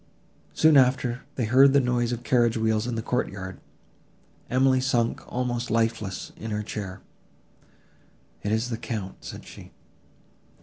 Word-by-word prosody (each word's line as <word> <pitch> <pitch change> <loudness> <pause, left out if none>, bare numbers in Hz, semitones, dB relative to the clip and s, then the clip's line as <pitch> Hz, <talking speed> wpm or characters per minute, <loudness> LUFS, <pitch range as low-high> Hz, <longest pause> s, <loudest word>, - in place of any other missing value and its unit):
Soon 155 -2 +6
after, 125 -1 +3
they 120 - 0
heard 135 +4 +6
the 140 - +6
noise 125 -2 0
of 120 0 -4
carriage 120 -2 +2
wheels 110 0 +1
in 120 - -2
the 115 - -3
courtyard. 95 -7 -3 0.9
Emily 130 0 +3
sunk 120 -3 0
almost 120 -1 -2
lifeless 115 -3 -1
in 110 - -6
her 105 0 -2
chair; 100 -3 -6 1.4
"It 105 - -2
is 110 +3 0
the 115 - -2
Count," 110 -5 -5
said - - -8
she. - - -12
120 Hz, 140 wpm, -26 LUFS, 110-125 Hz, 1.4 s, Soon